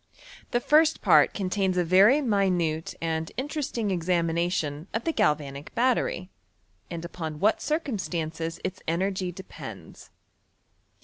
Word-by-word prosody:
The 240 Hz, -, +1 dB
first 310 Hz, +5 st, +3 dB
part -, -, +6 dB
contains 190 Hz, -1 st, -1 dB
a 180 Hz, -, +3 dB
very 195 Hz, -, +5 dB
minute 180 Hz, -8 st, 0 dB
and 160 Hz, -1 st, -2 dB
inte 290 Hz, +5 st, -3 dB
resting 235 Hz, -8 st, -1 dB
examination 170 Hz, -3 st, 0 dB
of 225 Hz, -, -1 dB
the 330 Hz, -, 0 dB
galvanic 145 Hz, -, -1 dB
battery, 240 Hz, -6 st, +1 dB, 0.6 s
and 170 Hz, -1 st, -5 dB
Wjpaa 160 Hz, -3 st, -5 dB
what 210 Hz, +8 st, +2 dB
circumstances 170 Hz, -, -2 dB
its 185 Hz, 0 st, -4 dB
energy 185 Hz, +2 st, -1 dB
depends. 185 Hz, +1 st, -10 dB
185 Hz, 120 wpm, -27 LUFS, 165-215 Hz, 0.6 s, part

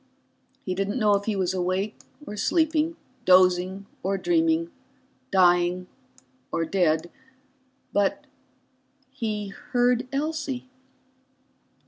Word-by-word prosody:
He 185 Hz, -, -1 dB
didn't 195 Hz, +5 st, -1 dB
know 210 Hz, -4 st, +3 dB
if 200 Hz, 0 st, +1 dB
he 220 Hz, -, 0 dB
was 190 Hz, -1 st, 0 dB
awake 185 Hz, +3 st, -1 dB, 0.3 s
or 210 Hz, -, -6 dB
sleeping, 320 Hz, +7 st, +1 dB, 0.3 s
dozing 185 Hz, +1 st, +4 dB, 0.2 s
or 195 Hz, +1 st, 0 dB
dreaming, 330 Hz, -, +1 dB, 0.6 s
dying 180 Hz, -1 st, +3 dB, 0.7 s
or 165 Hz, -, 0 dB
dead. 170 Hz, -2 st, +1 dB, 0.8 s
But 200 Hz, -1 st, +1 dB, 0.9 s
he 215 Hz, -6 st, -3 dB
heard 245 Hz, +4 st, 0 dB
Elsie. 280 Hz, -3 st, -3 dB
200 Hz, 95 wpm, -25 LUFS, 185-265 Hz, 0.9 s, dozing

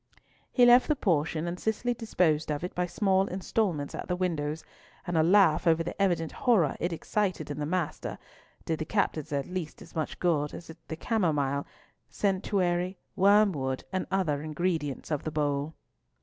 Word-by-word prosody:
He 245 Hz, -, +5 dB
left 245 Hz, +1 st, +7 dB
the 300 Hz, -, +2 dB
potion, 165 Hz, -, 0 dB
and 175 Hz, +1 st, -4 dB
Cicely 230 Hz, +3 st, 0 dB
disposed 175 Hz, -10 st, +1 dB
of 145 Hz, +2 st, -3 dB
it 180 Hz, -, -4 dB
by 180 Hz, 0 st, -1 dB
small 195 Hz, 0 st, +2 dB
instalments 185 Hz, -5 st, -1 dB
at -, -, -6 dB
the 180 Hz, -, 0 dB
windows; 160 Hz, -4 st, -2 dB, 0.4 s
and 175 Hz, -2 st, -3 dB
a 160 Hz, -, +5 dB
laugh 175 Hz, -1 st, +4 dB
over 165 Hz, 0 st, +4 dB
the 175 Hz, -, -5 dB
evident 170 Hz, -5 st, +1 dB
horror 220 Hz, -, +2 dB
it 175 Hz, -, -1 dB
excited 185 Hz, 0 st, -2 dB
in 145 Hz, -, -5 dB
the 145 Hz, -, -2 dB
master, 175 Hz, -2 st, -2 dB, 0.5 s
did 160 Hz, -1 st, -1 dB
the 155 Hz, -, -2 dB
captives 160 Hz, -5 st, -1 dB
at 140 Hz, -2 st, -1 dB
least 180 Hz, -4 st, -5 dB
as -, -, -14 dB
much 155 Hz, -2 st, -2 dB
good 150 Hz, -5 st, 0 dB
as 170 Hz, -, -9 dB, 0.2 s
the 160 Hz, -, -4 dB
camomile, 150 Hz, -, 0 dB, 0.4 s
centaury, 185 Hz, -2 st, 0 dB, 0.2 s
wormwood, 190 Hz, -10 st, +3 dB
and 185 Hz, -, -1 dB
other 170 Hz, -7 st, 0 dB
ingredients 155 Hz, -2 st, -2 dB
of 150 Hz, -, -1 dB
the -, -, -2 dB
bowl. 145 Hz, 0 st, -1 dB
175 Hz, 170 wpm, -28 LUFS, 155-190 Hz, 0.5 s, left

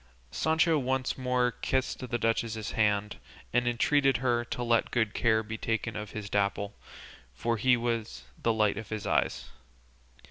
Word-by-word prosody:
Sancho 160 Hz, -, +2 dB
once 130 Hz, 0 st, -1 dB
more 125 Hz, -1 st, +1 dB
kissed 130 Hz, +2 st, -1 dB
the 120 Hz, -, 0 dB
duchess's 115 Hz, -1 st, -1 dB
hand, 105 Hz, -1 st, +1 dB, 0.4 s
and 120 Hz, 0 st, +2 dB
entreated 135 Hz, +2 st, +3 dB
her 120 Hz, -1 st, +1 dB
to 120 Hz, -, -4 dB
let 115 Hz, -1 st, +2 dB
good 110 Hz, -3 st, 0 dB
care 110 Hz, -2 st, +2 dB
be 110 Hz, +1 st, -6 dB
taken 115 Hz, 0 st, -2 dB
of 105 Hz, -1 st, -5 dB
his 105 Hz, -1 st, -6 dB
Dapple, 100 Hz, 0 st, 0 dB, 0.6 s
for 115 Hz, +7 st, -1 dB
he 125 Hz, +2 st, +4 dB
was 115 Hz, -2 st, -3 dB, 0.2 s
the 115 Hz, -, +2 dB
light 110 Hz, -2 st, +2 dB
of 110 Hz, -, -9 dB
his 110 Hz, -1 st, -4 dB
eyes. -, -, 0 dB
115 Hz, 155 wpm, -29 LUFS, 110-125 Hz, 0.6 s, he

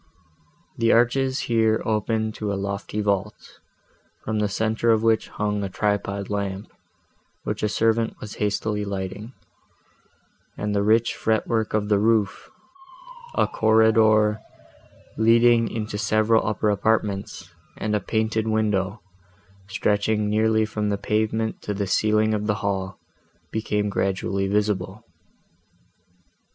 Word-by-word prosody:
The 115 Hz, 0 st, +3 dB
arches 130 Hz, +3 st, +2 dB
here 110 Hz, -1 st, +2 dB
opened 110 Hz, 0 st, -1 dB
to 105 Hz, -1 st, -3 dB
a -, -, -1 dB
lofty 100 Hz, +2 st, -3 dB
vault, 100 Hz, 0 st, -3 dB, 0.6 s
from 110 Hz, 0 st, -2 dB
the 105 Hz, -1 st, 0 dB
centre 110 Hz, +3 st, 0 dB
of 110 Hz, -1 st, +3 dB
which 115 Hz, -1 st, +2 dB
hung 105 Hz, -1 st, -2 dB
a 100 Hz, -, -3 dB
tripod 100 Hz, 0 st, -2 dB
lamp, 100 Hz, -1 st, -4 dB, 0.7 s
which -, -, -3 dB
a 105 Hz, -, +1 dB
servant 115 Hz, +2 st, 0 dB
was 105 Hz, -, -8 dB
hastily 105 Hz, 0 st, -1 dB
lighting; 100 Hz, +3 st, -5 dB, 1.2 s
and 105 Hz, 0 st, -2 dB
the 100 Hz, -, +1 dB
rich 110 Hz, +3 st, +3 dB
fret 110 Hz, -1 st, 0 dB
work 110 Hz, -2 st, 0 dB
of 105 Hz, -1 st, 0 dB
the 105 Hz, -1 st, +3 dB
roof, 110 Hz, -1 st, +1 dB, 0.9 s
a -, -, +3 dB
corridor, 110 Hz, -1 st, +3 dB, 0.8 s
leading 115 Hz, +1 st, +4 dB
into 105 Hz, -2 st, -4 dB
several 110 Hz, +1 st, +2 dB
upper 105 Hz, 0 st, +1 dB
apartments, 100 Hz, -1 st, -1 dB, 0.2 s
and 105 Hz, -1 st, -1 dB
a -, -, +2 dB
painted 110 Hz, +1 st, -1 dB
window, 105 Hz, -2 st, 0 dB, 0.6 s
stretching 105 Hz, +1 st, 0 dB
nearly 110 Hz, +1 st, +2 dB
from 105 Hz, -1 st, -2 dB
the 100 Hz, -, 0 dB
pavement 110 Hz, +2 st, -1 dB
to 105 Hz, -, -4 dB
the 100 Hz, 0 st, -1 dB
ceiling 110 Hz, +2 st, +2 dB
of 105 Hz, 0 st, -2 dB
the 105 Hz, -, +1 dB
hall, 95 Hz, -1 st, -2 dB, 0.5 s
became 105 Hz, -1 st, -1 dB
gradually 95 Hz, 0 st, -1 dB
visible. 105 Hz, 0 st, -1 dB
105 Hz, 125 wpm, -23 LUFS, 100-110 Hz, 1.2 s, leading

